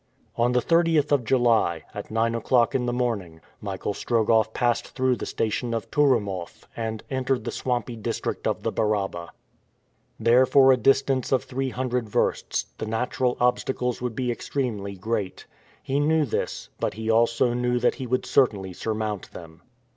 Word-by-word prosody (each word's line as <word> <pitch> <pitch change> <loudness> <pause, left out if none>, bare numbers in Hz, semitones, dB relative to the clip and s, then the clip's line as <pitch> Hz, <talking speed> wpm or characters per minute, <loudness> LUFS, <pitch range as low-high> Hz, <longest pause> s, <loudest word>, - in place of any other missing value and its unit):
On 120 +1 +2
the 125 -1 +2
30th 165 -3 +3
of 140 -4 +3
July, 115 -9 +2
at 105 - -7
nine 115 +1 +1
o'clock 115 +1 +2
in 125 -2 0
the - - +1
morning, 110 -10 -2 0.2
Michael 100 0 -3
Strogoff 110 -1 +2
passed 120 0 -1
through 130 -1 +2
the - - -6
station 115 +2 -1
of 115 - -5
Touroumoff 105 -11 0
and 110 -1 -4
entered 130 0 0
the - - -3
swampy 125 -1 -2
district 110 - -3
of - - -2
the - - 0
Baraba. 100 -5 -1 0.9
There, 120 +3 +5
for 135 0 +6
a - - +6
distance 135 +1 +2
of 130 - +2
three 135 +1 -3
hundred 125 -2 -2
versts, - - 0
the - - -3
natural 125 +2 -1
obstacles 125 0 0
would 125 -3 -3
be 125 0 -1
extremely 115 -6 -3
great. 105 0 -3 0.4
He 135 +1 0
knew 155 +1 +3
this, 120 - -3
but - - -2
he 110 +1 -1
also 115 +2 +3
knew 125 0 0
that 120 0 +2
he 130 - -4
would 130 +2 0
certainly 100 -8 +2
surmount 110 -1 -3
them. 80 0 -11
120 Hz, 165 wpm, -25 LUFS, 110-130 Hz, 0.9 s, for